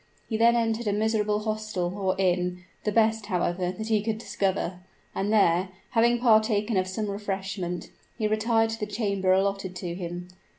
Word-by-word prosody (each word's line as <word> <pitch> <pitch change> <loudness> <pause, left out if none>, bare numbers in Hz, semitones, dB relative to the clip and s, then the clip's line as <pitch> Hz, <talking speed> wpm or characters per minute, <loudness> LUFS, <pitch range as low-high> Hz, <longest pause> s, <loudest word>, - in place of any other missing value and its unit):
He 225 - -2
then 230 +2 +5
entered 230 -1 0
a 205 - +2
miserable 210 0 +1
hostel, 215 -5 -2
or 190 -2 0
inn 180 -1 0 0.2
the 210 - +1
best, 220 -1 +2
however, 180 -2 0
that 220 +4 -6
he 215 -2 +3
could 215 0 -2
discover; 190 -4 -2 0.3
and 200 +2 -1
there, 185 -3 +3 0.2
having 235 0 +4
partaken 220 -2 +3
of 185 -1 +1
some 200 +3 -3
refreshment, 195 -3 -4 0.3
he 215 -3 +1
retired 225 +1 +2
to 225 - -5
the 210 - -2
chamber 200 -4 0
allotted 195 -1 +1
to 180 -2 -4
him. 175 0 -6
205 Hz, 170 wpm, -27 LUFS, 185-220 Hz, 0.3 s, then